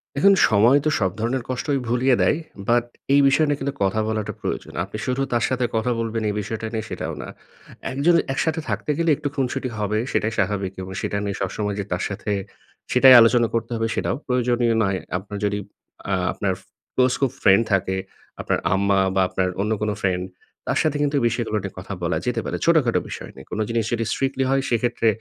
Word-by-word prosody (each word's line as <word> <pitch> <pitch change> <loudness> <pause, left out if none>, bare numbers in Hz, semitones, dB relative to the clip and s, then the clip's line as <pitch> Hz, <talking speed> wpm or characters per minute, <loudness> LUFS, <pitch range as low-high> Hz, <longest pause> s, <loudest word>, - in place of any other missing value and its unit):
দেখুন, 195 +8 +6 0.2
সময় 115 +6 +5
তো - - +4
সব 95 -2 +1
ধরনের 120 +3 -1
কষ্টই 135 +2 -1
ভুলিয়ে 125 +2 +3
দেয়। 150 - +3 0.3
বাট 120 0 +3 0.3
এই 140 - +6
বিষয় 140 +3 +4
নিয়ে 145 -1 0
কিন্তু 140 0 -2
কথা 100 +3 +1
বলাটা 110 -2 -2
প্রয়োজন। - - -4
আপনি 100 +3 -7
শুধু 130 +1 -1
তার 120 - +2
সাথে 130 -1 0
কথা 110 +2 +1
বলবেন 115 0 -2
এই 105 - -2
বিষয় 110 +2 -4
টা 110 - -3
নিয়ে, 110 0 -2
সেটাও - - -4
না। - - -7 0.6
একজন 145 +6 +3 0.2
একসাথে 160 +3 0
থাকতে - - -1
গেলে 170 -1 +1
একটু 150 -1 -3
খুনসুটি 130 -1 -1
হবে 105 0 -1
সেটাই 115 +1 0
স্বাভাবিক 100 -2 0
এবং 95 0 -7
সেটা 100 - -2
নিয়ে 100 -1 -3
সবসময় 100 +1 -2
যে 100 - -2
তার 90 0 -1
সাথে, 100 +1 -4 0.6
সেটাই 130 +1 +8
আলোচনা 115 0 +4
করতে 115 +1 -2
হবে, 115 0 0
সেটাও - - -1
প্রয়োজনীয় 125 -2 +2
নয়। 95 -1 0 0.2
আপনার 100 +2 -7
যদি 105 0 0 0.5
আ - - +2 0.2
আপনার 95 -2 -1
ফো - - -28 0.3
ক্লোজ 130 0 +3
খুব 135 - +2
ফ্রেন্ড 95 +4 +5
থাকে, 95 0 +1 0.5
আপনার - - 0
আম্মা 100 0 +2 0.2
বা 95 - +4
আপনার 95 0 0
অন্য 105 +2 -1
কোনো 105 -1 0
ফ্রেন্ড, 90 -1 +1 0.4
তার - - +1
সাথে 150 -2 +1
কিন্তু 145 0 +1
এই - - -2
বিষয়গুলো 115 -2 -2
নিয়ে 95 - -5
কথা 95 +2 -7
বলা 85 +1 0
যেতে 125 - 0
পারে, - - -2
ছোটখাটো 155 -8 +3
বিষয় - - -7
নিয়ে। 65 - -12
কোনো 110 - -2
জিনিস 115 -2 0
যদি 115 -1 0
strictly 135 0 0
হয়, 135 0 +2
সেক্ষেত্রে 120 -1 +1
115 Hz, 205 wpm, -23 LUFS, 100-130 Hz, 0.6 s, সেটাই